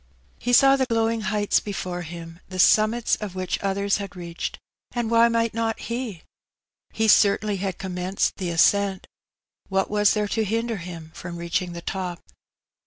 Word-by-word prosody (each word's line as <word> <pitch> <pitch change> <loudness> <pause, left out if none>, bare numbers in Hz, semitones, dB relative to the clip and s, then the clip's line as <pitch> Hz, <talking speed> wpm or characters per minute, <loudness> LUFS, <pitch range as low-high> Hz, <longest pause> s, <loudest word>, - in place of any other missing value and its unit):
He 245 - -1
saw 270 +3 +7
the 260 -1 +1
glowing 225 -1 +1
heights 210 0 +1
before 185 -3 -4
him^ 165 0 -9
the 185 - -7
summits 215 +5 +4
of 205 -4 -6
which 185 -1 -2
others 200 0 0
had 200 -1 -5
reached^ 170 -1 -5 0.4
and 235 -2 -2
why 230 0 +6
might 230 -1 +1
not 225 0 -1
he? 235 -7 -5 0.7
He 220 0 0
cer 200 -1 +6
tainly 210 -3 -3
had 190 -2 -3
commenced 185 0 -2
the 185 -3 -3
ascent: 190 +3 +2 0.6
what 195 0 0
was 210 0 +3
there 210 -1 0
to 225 - 0
hinder 225 +2 -1
him 170 -3 -8
from 175 -1 -7
reaching 170 +1 -2
the 170 0 -8
top? 180 -3 -4
200 Hz, 170 wpm, -24 LUFS, 180-225 Hz, 0.7 s, saw